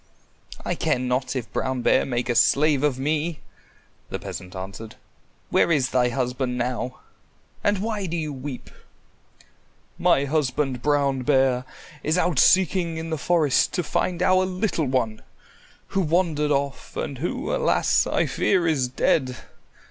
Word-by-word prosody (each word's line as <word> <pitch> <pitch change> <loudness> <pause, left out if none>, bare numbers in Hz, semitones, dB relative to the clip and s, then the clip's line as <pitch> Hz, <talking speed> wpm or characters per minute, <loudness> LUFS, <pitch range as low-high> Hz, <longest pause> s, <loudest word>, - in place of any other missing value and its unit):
"I - - 0
care - - 0
not 125 +1 -1
if 125 -3 -5
Brown 130 -2 -2
Bear - - +3
make 120 -1 -2
a 120 - +1
slave 140 +4 +3
of 145 -3 +1
me," 150 +3 -1 0.7
the - - -3
peasant 90 0 -8
answered. 95 +4 -7 0.6
"Where - - +3
is 140 -6 +2
thy 125 -1 +3
husband 125 0 -2
now, 125 +1 -3 0.6
and 205 0 +2
why 215 -4 -2
do 170 +1 -3
you 155 -2 -3
weep?" 130 -1 -7 1.3
"My 140 - +3
husband, 135 -3 -1
Brown 140 -2 +1
Bear, 130 -2 +2 0.4
is 155 +4 0
out 175 -6 +1
seeking 180 -3 +3
in 165 0 -5
the 160 - -1
forest 155 -5 +2
to 180 - 0
find 175 +3 -1
our 185 0 +4
little 185 -3 -1
one, 115 -4 -1 0.7
who 195 - 0
wandered 160 -3 +1
off 140 -1 -2
and 135 -3 -4
who, 170 - -2
alas, - - +2
I - - +1
fear 185 -4 +1
is 145 -6 +1
dead. 130 0 0
140 Hz, 150 wpm, -24 LUFS, 125-165 Hz, 1.3 s, our